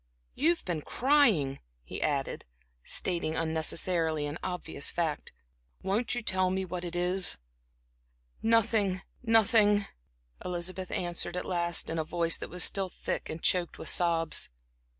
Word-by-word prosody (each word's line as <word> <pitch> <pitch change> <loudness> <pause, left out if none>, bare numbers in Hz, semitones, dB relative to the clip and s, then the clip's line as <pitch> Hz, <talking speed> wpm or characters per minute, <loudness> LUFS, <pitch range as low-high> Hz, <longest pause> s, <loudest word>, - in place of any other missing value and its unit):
You've 335 +4 +1
been 170 -4 -2
crying," 230 - +3 0.2
he - - -7
added, 140 -3 -1 0.4
stating 170 -3 -1
unnecessarily 160 0 0
an 145 +3 -5
obvious 180 -5 -2
fact. 160 -4 -2 0.5
"Won't 205 +6 0
you 240 - -3
tell 185 -2 +2
me 190 +1 -1
what 180 0 -5
it 175 0 -5
is?" 180 - +2 1.0
"Nothing 215 -4 +2 0.2
nothing," 220 -3 +4 0.6
Elizabeth 180 +1 -4
answered 175 0 -2
at - - -3
last, 170 -2 0
in 165 0 -2
a - - 0
voice 165 +1 +1
that - - -7
was 180 +1 +1
still 195 -1 +3
thick - - -4
and 160 +1 -6
choked 180 -2 +1
with - - -3
sobs. 165 -2 +2
180 Hz, 135 wpm, -29 LUFS, 165-195 Hz, 1.0 s, nothing